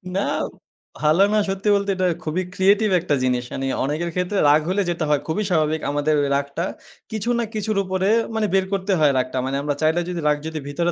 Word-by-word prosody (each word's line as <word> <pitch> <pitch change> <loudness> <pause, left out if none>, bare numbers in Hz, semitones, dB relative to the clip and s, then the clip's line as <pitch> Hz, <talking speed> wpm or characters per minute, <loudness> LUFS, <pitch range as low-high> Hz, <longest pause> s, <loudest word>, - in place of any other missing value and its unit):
না, 195 - +1 0.8
ভালো 155 +5 +4
না, - - +3
সত্যি 195 +2 -1
বলতে 200 0 0
এটা 185 -1 +1 0.2
খুবই 165 +4 -1
ক্রিয়েটিভ 200 +3 +3
একটা 160 -4 0
জিনিস। 125 -1 +1
মানি 135 0 -3 0.2
অনেকের 155 +5 -2
ক্ষেত্রে 180 +3 -1
রাগ 150 +1 +5
হলে 200 +2 +1
যেটা 170 -2 -1
হয় 145 -2 +2
খুবই 195 +7 -1
স্বাভাবিক 155 -2 +1
আমাদের 145 +1 +1 0.2
রাগটা 140 +4 -2 0.5
কিছু 215 +1 -3
না - - +1
কিছুর 215 -1 -2
উপরে 190 +1 0 0.3
মানি 215 -1 +1
বের 190 -1 +3
করতে 195 0 0
হয় 150 -2 +5
রাগটা। 130 0 -1
মানি 135 +1 -2
আমরা 145 -1 -1
চাইলে 160 +2 +2
যদি 175 -1 -3
রাগ 150 - +3
যদি 160 -1 -4
ভিতরে 170 +5 -1
170 Hz, 205 wpm, -22 LUFS, 150-195 Hz, 0.8 s, রাগ